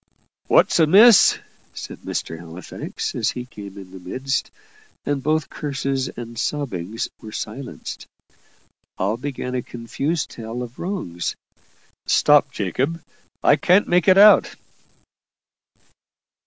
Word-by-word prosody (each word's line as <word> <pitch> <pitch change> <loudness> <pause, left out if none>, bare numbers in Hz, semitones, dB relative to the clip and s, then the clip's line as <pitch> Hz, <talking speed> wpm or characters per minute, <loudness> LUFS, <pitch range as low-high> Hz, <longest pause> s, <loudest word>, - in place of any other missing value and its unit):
"What's - - +4
amiss?" 200 +8 +7 0.4
said - - -8
Mr. 80 - -5
Halifax, 85 +2 -6
as - - 0
he 125 - -5
came 100 -5 -11
in 95 -2 -11
the 95 - -10
midst 130 +9 -3 0.6
and 145 -1 -1
both 155 +2 0
curses 135 -2 -2
and 120 -1 -8
sobbings 115 - -3
were 110 - -9
silenced. 120 +5 -7 0.9
All 100 +4 0
began 125 0 -5
a 125 - -1
confused 135 +8 -3
tale 115 +2 -6
of 120 0 -11
wrongs. 170 - -4 0.7
"Stop, 145 -1 +4
Jacob 130 - -2 0.4
I 145 - +5
can't 185 +5 +3
make 175 -1 +2
it 190 0 +6
out." 210 +1 +7
130 Hz, 115 wpm, -22 LUFS, 110-150 Hz, 0.9 s, amiss